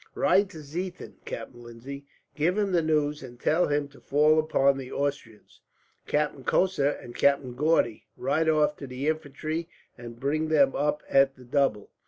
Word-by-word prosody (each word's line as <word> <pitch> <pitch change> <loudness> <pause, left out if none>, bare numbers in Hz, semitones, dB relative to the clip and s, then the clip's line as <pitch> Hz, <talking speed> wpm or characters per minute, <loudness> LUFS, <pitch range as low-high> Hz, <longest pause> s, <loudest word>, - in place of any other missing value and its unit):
"Ride 185 +2 +3
to 160 -5 -10
Ziethen, 175 +5 -6
Captain 120 - -7
Lindsay. 125 +4 -9 0.3
Give 170 +6 0
him 205 -2 +1
the 175 -2 +3
news, 150 -1 0
and 120 -2 -11
tell 165 +7 +2
him 145 0 0
to 140 - -18
fall 150 +2 +3
upon 140 -3 +2
the 130 -1 -8
Austrians. 140 -6 -4 0.5
"Captain 150 -2 -1
Cosser 180 -5 +2
and 120 -4 -7
Captain 140 -2 +2
Gaudy, 130 -5 +1
ride 155 +5 +1
off 150 -1 +3
to 140 - -8
the 130 +3 -4
infantry 155 +2 -3 0.3
and 120 -1 -9
bring 155 +4 0
them 145 -4 +3
up 150 +1 0
at 135 0 +4
the 125 - -15
double. 125 -5 0
145 Hz, 170 wpm, -27 LUFS, 135-155 Hz, 0.5 s, at